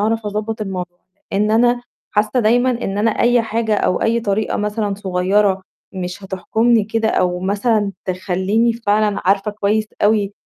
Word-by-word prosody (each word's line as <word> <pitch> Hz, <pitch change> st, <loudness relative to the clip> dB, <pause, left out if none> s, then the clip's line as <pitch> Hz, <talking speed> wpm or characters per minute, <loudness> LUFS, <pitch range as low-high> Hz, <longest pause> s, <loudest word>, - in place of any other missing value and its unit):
أعرَف 220 Hz, +1 st, 0 dB
أضبّط 215 Hz, +2 st, -3 dB
الموضوع 180 Hz, -3 st, -5 dB, 0.3 s
إن 210 Hz, +2 st, +1 dB
أنا 240 Hz, +2 st, +3 dB, 0.3 s
حاسّة 215 Hz, +4 st, +1 dB
دايمًا 245 Hz, +4 st, +3 dB
إن 205 Hz, -5 st, -3 dB
أنا 225 Hz, +2 st, +3 dB
أي 240 Hz, +2 st, +2 dB
حاجة 225 Hz, -1 st, -1 dB
أو 195 Hz, -, 0 dB
أي 230 Hz, +1 st, +2 dB
طريقة 215 Hz, -1 st, -1 dB
مثلًا 210 Hz, -1 st, -1 dB
صغيّرة 190 Hz, 0 st, +1 dB, 0.3 s
مش 185 Hz, +1 st, -6 dB
هتحكمني 220 Hz, +4 st, +1 dB
كده 220 Hz, +1 st, 0 dB
أو 180 Hz, -4 st, 0 dB
مثلًا 205 Hz, +2 st, 0 dB
تخلّيني 190 Hz, +4 st, 0 dB
فعلًا 215 Hz, -2 st, 0 dB
عارفة 195 Hz, +2 st, +2 dB
كويس 210 Hz, +1 st, 0 dB, 0.2 s
أوي 205 Hz, -1 st, +2 dB
210 Hz, 150 wpm, -18 LUFS, 195-225 Hz, 0.3 s, أنا